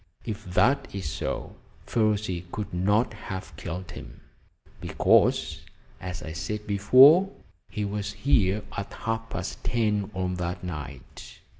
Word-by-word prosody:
If 110 Hz, -3 st, -5 dB
that 100 Hz, +10 st, +2 dB
is 95 Hz, -5 st, -3 dB
so, -, -, -4 dB, 0.3 s
Ferruci 105 Hz, -5 st, 0 dB
could 105 Hz, -3 st, -5 dB
not 105 Hz, +7 st, +2 dB
have 95 Hz, -4 st, -7 dB
killed 90 Hz, +2 st, -6 dB
him, -, -, -10 dB, 0.6 s
because, -, -, +2 dB, 0.4 s
as 90 Hz, 0 st, -6 dB
I 80 Hz, -, -6 dB
said 105 Hz, +6 st, -4 dB
before, 130 Hz, -, +7 dB, 0.4 s
he 105 Hz, -, -3 dB
was 100 Hz, 0 st, -3 dB
here 105 Hz, -7 st, +2 dB
at 100 Hz, -, -4 dB
half 115 Hz, 0 st, -3 dB
past -, -, -5 dB
ten 105 Hz, -4 st, 0 dB
on 90 Hz, 0 st, -1 dB
that 90 Hz, +1 st, -3 dB
night." 70 Hz, -6 st, -8 dB
100 Hz, 130 wpm, -27 LUFS, 90-110 Hz, 0.6 s, before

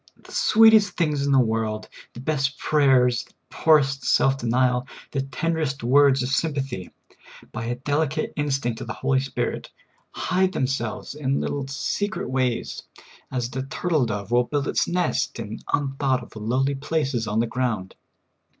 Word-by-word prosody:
The -, -, -17 dB
sweetest 220 Hz, -3 st, +5 dB
things 150 Hz, -4 st, +1 dB
in -, -, +2 dB
the 135 Hz, -, +5 dB
world 110 Hz, -3 st, 0 dB
— -, -, -24 dB
the 120 Hz, -, -8 dB
best 135 Hz, -1 st, -1 dB
prayers, 130 Hz, -5 st, +3 dB
the -, -, -23 dB, 0.2 s
poorest 140 Hz, -4 st, +3 dB
self 135 Hz, 0 st, +3 dB
denial, 125 Hz, +1 st, +1 dB, 0.2 s
the 135 Hz, -, -1 dB
tenderest 150 Hz, -1 st, -2 dB
words 135 Hz, +1 st, +5 dB
of 125 Hz, -, -2 dB
sympa 140 Hz, -1 st, 0 dB
thy 95 Hz, -9 st, -7 dB, 0.3 s
— -, -, -18 dB
by 115 Hz, -1 st, -5 dB
a 120 Hz, +1 st, -2 dB
delicate 145 Hz, +3 st, -1 dB
instinct 135 Hz, -5 st, -1 dB
of -, -, -6 dB
the -, -, -3 dB
Holy 135 Hz, -1 st, +1 dB
Spirit, 135 Hz, -1 st, -3 dB, 0.4 s
hide 185 Hz, +1 st, 0 dB
themselves 130 Hz, -6 st, -2 dB
in 140 Hz, -2 st, -1 dB
little 140 Hz, -2 st, -3 dB
secret 140 Hz, +4 st, -2 dB
ways, 130 Hz, -2 st, -1 dB, 0.5 s
as 125 Hz, -2 st, -2 dB
the 130 Hz, -, -3 dB
turtle 150 Hz, 0 st, 0 dB
dove 105 Hz, -1 st, -4 dB
will 120 Hz, 0 st, +4 dB
build 145 Hz, +1 st, -2 dB
its -, -, +1 dB
nest 180 Hz, 0 st, 0 dB
in 110 Hz, 0 st, -6 dB
un 140 Hz, -2 st, 0 dB
thought 130 Hz, -3 st, +1 dB
of, -, -, -15 dB
lowly 125 Hz, +6 st, 0 dB
places 135 Hz, -4 st, -1 dB
on 105 Hz, +1 st, 0 dB
the 115 Hz, -, +2 dB
ground. 115 Hz, -6 st, -2 dB
135 Hz, 170 wpm, -24 LUFS, 120-145 Hz, 0.5 s, sweetest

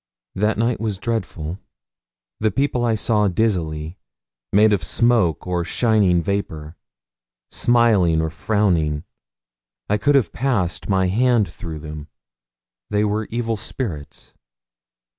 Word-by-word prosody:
That 105 Hz, +2 st, 0 dB
night 115 Hz, +2 st, 0 dB
was 110 Hz, -4 st, -2 dB
dreadful. 95 Hz, -6 st, -4 dB, 0.8 s
The 110 Hz, -, +2 dB
people 125 Hz, +2 st, 0 dB
I 115 Hz, -2 st, +2 dB
saw 105 Hz, -1 st, +1 dB
dizzily, 85 Hz, -5 st, -1 dB, 0.5 s
made 105 Hz, +1 st, +5 dB
of 95 Hz, -5 st, 0 dB
smoke 110 Hz, -2 st, +2 dB
or 90 Hz, -1 st, -1 dB
shining 100 Hz, -4 st, +2 dB
vapour, 80 Hz, -6 st, -3 dB, 0.8 s
smiling 110 Hz, -9 st, +3 dB
or 80 Hz, 0 st, -1 dB
frowning, 90 Hz, -7 st, 0 dB, 0.9 s
I 105 Hz, -, +2 dB
could 145 Hz, +5 st, +3 dB
have 125 Hz, -11 st, +2 dB
passed 110 Hz, -12 st, -1 dB
my 95 Hz, -1 st, +2 dB
hand 115 Hz, +2 st, +2 dB
through 80 Hz, -2 st, -8 dB
them. 75 Hz, -1 st, -8 dB, 0.8 s
They 105 Hz, 0 st, +1 dB
were 105 Hz, +1 st, -1 dB
evil 115 Hz, -1 st, -2 dB
spirits. 90 Hz, -, -6 dB
100 Hz, 120 wpm, -21 LUFS, 85-115 Hz, 0.9 s, made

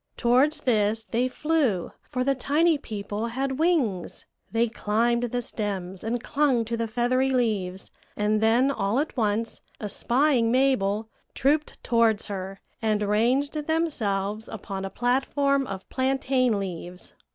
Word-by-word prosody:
Towards 270 Hz, +5 st, +3 dB
this 220 Hz, -3 st, +1 dB
they 235 Hz, +3 st, 0 dB
flew, 270 Hz, -, 0 dB, 0.2 s
for 255 Hz, -3 st, -1 dB
the 275 Hz, +1 st, +2 dB
tiny 300 Hz, +4 st, +2 dB
people 210 Hz, -1 st, -4 dB
had 265 Hz, +3 st, -2 dB
wings; 280 Hz, -, 0 dB, 0.3 s
they 230 Hz, +1 st, +2 dB
climbed 235 Hz, +2 st, 0 dB
the 245 Hz, +1 st, -2 dB
stems 195 Hz, -5 st, -4 dB
and 235 Hz, +2 st, -2 dB
clung 275 Hz, -6 st, +1 dB
to 230 Hz, +1 st, -2 dB
the 230 Hz, 0 st, -2 dB
feathery 250 Hz, +4 st, +1 dB
leaves, 210 Hz, -8 st, -1 dB, 0.3 s
and 210 Hz, +1 st, +1 dB
then 235 Hz, +5 st, +4 dB
all 210 Hz, -4 st, 0 dB
at 305 Hz, -, -2 dB
once, 225 Hz, -1 st, -1 dB, 0.2 s
espying 240 Hz, +3 st, +1 dB
Mabel, 225 Hz, -5 st, +2 dB, 0.3 s
trooped 295 Hz, +3 st, 0 dB
towards 230 Hz, -3 st, +2 dB
her, 195 Hz, -1 st, -6 dB, 0.2 s
and 215 Hz, -2 st, +1 dB
ranged 240 Hz, +8 st, +2 dB
themselves 220 Hz, -10 st, -1 dB
upon 195 Hz, -2 st, -6 dB
a -, -, -4 dB
platform 270 Hz, +4 st, +1 dB
of 190 Hz, -1 st, -7 dB
plantain 260 Hz, -3 st, +1 dB
leaves. 180 Hz, -2 st, -6 dB
235 Hz, 135 wpm, -26 LUFS, 210-270 Hz, 0.3 s, then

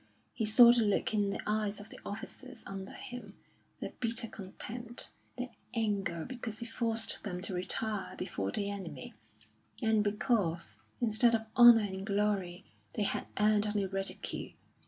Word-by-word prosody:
He 220 Hz, -, -1 dB
saw 235 Hz, +2 st, +9 dB
the 240 Hz, -, +3 dB
look 210 Hz, 0 st, +1 dB
in 205 Hz, -2 st, +2 dB
the 200 Hz, -, -2 dB
eyes 210 Hz, -1 st, 0 dB
of 205 Hz, +2 st, -11 dB
the -, -, -9 dB
officers 205 Hz, +2 st, -7 dB
under 195 Hz, 0 st, -6 dB
him, 235 Hz, -5 st, -8 dB, 0.4 s
their -, -, -4 dB
bitter 230 Hz, 0 st, -1 dB
contempt, 230 Hz, +4 st, -5 dB, 0.3 s
their 250 Hz, 0 st, -4 dB, 0.2 s
anger 200 Hz, -7 st, 0 dB
because 240 Hz, -4 st, -5 dB
he 235 Hz, -, -6 dB
forced 225 Hz, -1 st, -1 dB
them 180 Hz, -4 st, -4 dB
to 200 Hz, -, -3 dB
retire 200 Hz, +3 st, -1 dB
before 100 Hz, -, -2 dB
the 200 Hz, -, -1 dB
enemy; 170 Hz, -10 st, -6 dB, 0.7 s
and 220 Hz, -2 st, +3 dB
because, 195 Hz, -, 0 dB, 0.2 s
instead 235 Hz, +1 st, +4 dB
of 220 Hz, 0 st, -2 dB
honour 240 Hz, -2 st, +10 dB
and 190 Hz, -2 st, -3 dB
glory, 200 Hz, -3 st, 0 dB, 0.3 s
they 215 Hz, -, +1 dB
had -, -, -1 dB
earned 210 Hz, 0 st, +4 dB
only 210 Hz, -1 st, 0 dB
ridicule. 195 Hz, 0 st, -3 dB
210 Hz, 155 wpm, -32 LUFS, 195-225 Hz, 0.7 s, honour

